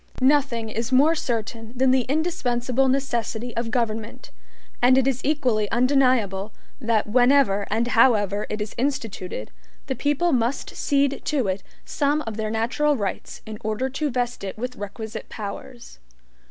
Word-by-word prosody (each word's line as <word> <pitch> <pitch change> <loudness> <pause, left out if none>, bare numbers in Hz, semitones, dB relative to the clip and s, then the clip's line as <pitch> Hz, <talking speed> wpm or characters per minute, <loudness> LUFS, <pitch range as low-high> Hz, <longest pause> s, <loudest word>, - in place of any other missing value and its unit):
Nothing 260 -4 +2
is 230 +3 -3
more 285 +5 +5
certain 230 -5 -3
than 260 +1 +3
the 255 -2 +2
indispensable 270 -5 0
necessity 240 -3 -1
of 230 0 -2
government, 225 -2 -3 0.5
and 255 +1 +6
it 265 - +3
is 260 -2 0
equally 250 -8 +1
undeniable, 240 -6 +2 0.3
that 230 -4 +1
whenever 245 -3 +3
and 225 +3 0
however 210 -4 +3
it 215 - -3
is 210 - -4
instituted, 220 - -3 0.3
the - - -2
people 295 +4 +1
must 245 +2 -1
cede 280 -1 +1
to 270 -8 +1
it 190 +1 -1 0.2
some 290 +1 0
of 225 -1 -5
their 215 0 -2
natural 255 +7 +1
rights 200 -4 -4
in 215 -1 -7
order 220 +5 -1
to 295 +2 -1
vest 245 -3 -2
it 195 +1 -5
with 250 +2 -4
requisite 220 +1 -7
powers. 220 - -8
240 Hz, 150 wpm, -24 LUFS, 220-265 Hz, 0.5 s, and